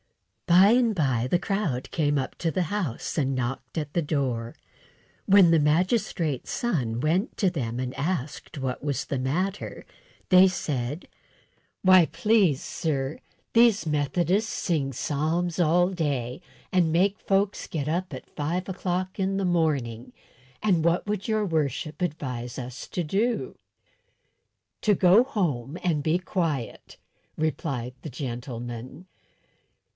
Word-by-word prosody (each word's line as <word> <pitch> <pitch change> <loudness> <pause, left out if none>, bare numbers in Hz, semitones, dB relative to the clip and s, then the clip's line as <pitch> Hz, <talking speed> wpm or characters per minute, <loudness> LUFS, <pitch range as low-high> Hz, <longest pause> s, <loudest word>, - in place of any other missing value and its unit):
By 185 +4 +7
and 235 -3 +3
by 130 -7 +1
the 175 - +3
crowd 175 - -2
came 145 -3 +1
up 135 - -3
to 165 - 0
the 185 +2 0
house, 175 - -3
and 135 -2 0
knocked 130 +5 -4
at 150 -2 -3
the 170 - +2
door. 130 -6 -2 0.7
When 190 -3 +6
the 165 - +5
magistrate's 160 - +1
son 135 - -1
went 175 - 0
to 190 -4 +2
them 120 -7 -3
and 130 0 -3
asked 145 -1 -3
what 130 -1 -3
was 145 -2 -1
the 140 - -2
matter, 180 +10 -2 0.4
they 185 0 +8
said: 145 -4 -3 0.8
"Why, 185 -3 +7
please, 170 -2 +2
sir, 145 -3 -2 0.3
these 230 -4 +5
Methodists 170 +8 +1
sing 150 -6 -1
psalms 160 +7 -1
all 175 +2 +4
day, 145 -7 -2 0.3
and 175 -3 +3
make 195 +5 +2
folks 195 +1 0
get 150 -3 -3
up 175 +3 -1
at 130 - -8
five 165 +5 -2
o'clock 185 0 -3
in 195 0 0
the 195 - 0
morning, 145 -10 0 0.5
and 180 -7 +3
what 170 +1 +2
would 205 -1 -3
your 215 -1 +1
worship 155 -2 -2
advise 130 -7 -3
us 125 0 -7
to 180 - -2
do?" 210 +9 -1 1.3
"To 210 -2 +3
go 185 +6 +6
home 165 - -2
and 160 -5 +1
be 160 +4 +2
quiet," 165 - -3 0.4
replied 140 -5 -2
the 155 - -6
gentleman. 120 +2 -6
160 Hz, 135 wpm, -26 LUFS, 135-185 Hz, 1.3 s, they